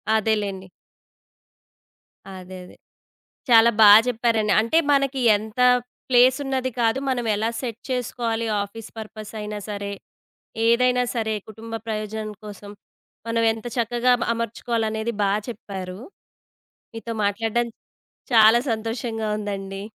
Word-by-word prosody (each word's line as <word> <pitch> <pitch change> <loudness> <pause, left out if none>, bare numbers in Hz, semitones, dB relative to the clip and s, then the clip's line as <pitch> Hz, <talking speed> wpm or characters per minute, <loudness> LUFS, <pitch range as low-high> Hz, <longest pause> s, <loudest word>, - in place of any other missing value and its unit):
అదేలెండి. 205 -3 -1 1.6
అదే, 185 0 -9
అదే. - - -16 0.7
చాలా 230 -1 +7
బా 215 - +9 0.2
చెప్పారండి. 225 -3 +1
అంటే 230 +9 +1 0.2
మనకి 275 -1 +1 0.2
ఎంత 215 +3 -9 0.5
ప్లేస్ 250 +1 +5
ఉన్నది 260 -1 -1
కాదు 230 +2 +2
మనం 245 -2 -1
ఎలా 220 +2 -1
సెట్ 235 -3 -5
చేసుకోవాలి 235 -2 -2 0.2
ఆఫీస్ 215 +2 -10
పర్పస్ 215 -1 -8
అయినా 210 0 -5
సరే, 200 -1 -4 0.8
ఏదైనా 250 +1 +3
సరే 220 -2 -1 0.2
కుటుంబ 225 +1 -10
ప్రయోజనం 215 0 -4
కోసం 205 -1 -10 0.6
మనం 230 0 0
ఎంత 225 +2 -8
చక్కగా 240 +1 +1
అ - - -12
అమర్చుకోవాలనేది 230 -1 -2
బా 200 - +2 0.2
చెప్పారు. 190 -5 -7 0.9
మీతో 230 0 -6
మాట్లాడడం 225 +3 0 0.7
చాలా 220 +1 +7
సంతోషంగా 225 0 -3
ఉందండి. 195 -1 -5
225 Hz, 110 wpm, -23 LUFS, 210-235 Hz, 1.6 s, బా